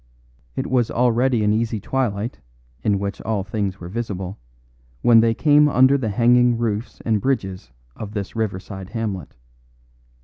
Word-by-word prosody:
It - - -2
was 125 -3 +1
already 120 -1 +2
an 105 0 +3
easy 115 0 -1
twilight, 115 -1 -2 0.4
in 105 -2 +1
which 100 +1 -4
all 110 -3 -1
things 100 -1 -3
were 85 - -8
visible, 95 -2 -5 0.6
when 115 -1 +7
they 115 0 +3
came 150 +1 +5
under 130 0 +5
the 130 -6 -1
hanging 120 +2 +4
roofs 115 0 -3
and 110 -3 +1
bridges 95 - -2 0.3
of 105 -1 -7
this 100 -1 -5
riverside 95 -3 -4
hamlet. 105 -8 -4
110 Hz, 145 wpm, -22 LUFS, 100-120 Hz, 0.6 s, when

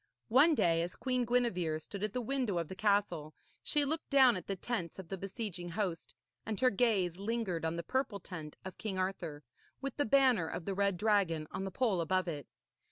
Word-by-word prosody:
One 290 +7 +6
day, 165 -7 +3
as 175 +1 -3
Queen 255 -2 0
Gwenevere 225 -10 +1
stood 200 +5 -7
at 215 +1 -2
a 250 - 0
window 245 -5 -1
of 165 -2 -2
the 190 - -6
castle, 185 -7 +1 0.3
she 295 -1 +2
looked 315 +3 -2
down 265 -4 +6
at 180 - -6
the 195 - -1
tents 185 -3 -3
of 190 -4 -9
the 195 - -2
besieging 190 -2 -5
host, 180 -2 -3 0.3
and 215 -2 -3
her 255 -1 +4
gaze 195 -6 +2
lingered 200 -5 -2
on 160 +1 0
the 170 - -3
purple 245 0 -1
tent 160 -5 -8
of 190 - -8
King 200 -4 -3
Arthur, 180 -6 -3 0.4
with 275 -1 -5
the 290 - +2
banner 250 -8 +4
of 165 - -5
the 195 - -1
red 200 -1 +1
dragon 190 -6 +2
on 195 - -3
the - - -2
pole 205 -4 +1
above 185 +2 +1
it. 150 -4 -4
195 Hz, 210 wpm, -33 LUFS, 175-240 Hz, 0.4 s, One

